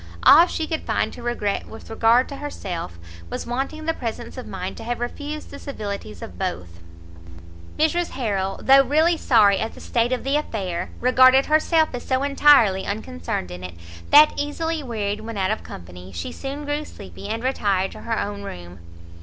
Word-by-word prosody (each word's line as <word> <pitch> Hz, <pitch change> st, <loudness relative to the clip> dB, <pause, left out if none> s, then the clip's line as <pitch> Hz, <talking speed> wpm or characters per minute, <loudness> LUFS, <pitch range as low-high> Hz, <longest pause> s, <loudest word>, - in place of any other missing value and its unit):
All 330 Hz, +5 st, +8 dB
she 320 Hz, -, -2 dB
could 315 Hz, 0 st, -3 dB
find -, -, -1 dB
to -, -, -10 dB
regret 235 Hz, -4 st, -2 dB
with 220 Hz, -, -11 dB
regard 225 Hz, +3 st, +3 dB
to 280 Hz, -, -7 dB
herself, 175 Hz, -, -6 dB, 0.3 s
was -, -, -5 dB
wanting 270 Hz, +6 st, -3 dB
the 325 Hz, -, +1 dB
presence 230 Hz, -7 st, -6 dB
of -, -, -8 dB
mind -, -, -5 dB
to -, -, -8 dB
have 240 Hz, +1 st, -3 dB
refused 290 Hz, +5 st, -5 dB
the 280 Hz, -, -9 dB
civilities 200 Hz, -, -6 dB
of 90 Hz, -1 st, -10 dB
both. 85 Hz, 0 st, -4 dB, 1.0 s
Mrs 340 Hz, +3 st, +1 dB
Harrel, 195 Hz, -6 st, -1 dB
though 275 Hz, +1 st, +7 dB
really 310 Hz, +6 st, +3 dB
sorry 215 Hz, -10 st, +4 dB
at 220 Hz, -, -3 dB
the -, -, -12 dB
state 235 Hz, +1 st, 0 dB
of 255 Hz, -, -1 dB
the 275 Hz, +2 st, +1 dB
affair, 185 Hz, -, -3 dB
regarded 255 Hz, +2 st, +6 dB
herself 315 Hz, +1 st, +3 dB
as 245 Hz, -, -4 dB
so 260 Hz, 0 st, 0 dB
entirely 275 Hz, -9 st, +5 dB
unconcerned 90 Hz, -, -4 dB
in 90 Hz, +1 st, -8 dB
it, 90 Hz, -2 st, -7 dB, 0.3 s
that, 300 Hz, +1 st, +8 dB
easily 320 Hz, +2 st, -2 dB
wearied 215 Hz, -5 st, -3 dB
when 225 Hz, -1 st, -6 dB
out 190 Hz, 0 st, +1 dB
of 215 Hz, -, -2 dB
company, 90 Hz, +1 st, -11 dB
she 85 Hz, -2 st, -5 dB
soon 280 Hz, +2 st, -6 dB
grew 290 Hz, +1 st, -2 dB
sleepy, 95 Hz, -, -10 dB
and 225 Hz, +1 st, -3 dB
retired 200 Hz, -7 st, 0 dB
to -, -, -11 dB
her 230 Hz, -1 st, -2 dB
own 205 Hz, 0 st, -3 dB
room. 90 Hz, -, -9 dB
235 Hz, 185 wpm, -23 LUFS, 195-285 Hz, 1.0 s, All